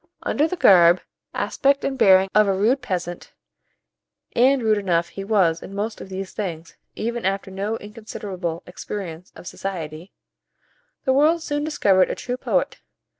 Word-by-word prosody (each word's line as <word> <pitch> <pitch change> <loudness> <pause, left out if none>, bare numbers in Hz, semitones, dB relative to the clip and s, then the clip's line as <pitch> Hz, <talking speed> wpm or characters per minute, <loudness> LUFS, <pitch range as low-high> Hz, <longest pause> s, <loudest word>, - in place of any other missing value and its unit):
Under 300 +3 +1
the 365 - -3
garb, 175 - +6 0.3
aspect, 280 0 +1
and 275 - -1
bearing 190 -6 +5
of 210 -1 +5
a 195 - +2
rude 240 +7 +2
peasant 175 -6 -5 1.0
(and 260 +1 +4
rude 215 -1 +3
enough 170 -4 0
he 195 - -7
was 190 -6 +2
in 195 - -9
most 210 +2 -3
of - - -9
these 190 0 -6
things, 170 -5 -5 0.2
even 235 +2 -3
after 195 0 -2
no 200 +4 -3
inconsiderable 205 -6 -6
experience 180 -2 -7
of - - -12
society), 170 -2 -6 0.9
the 265 - +2
world 315 +4 +3
soon 290 -1 -2
discovered 200 -11 +3
a - - -2
true 250 - -4
poet. - - -1
195 Hz, 155 wpm, -22 LUFS, 180-235 Hz, 1.0 s, garb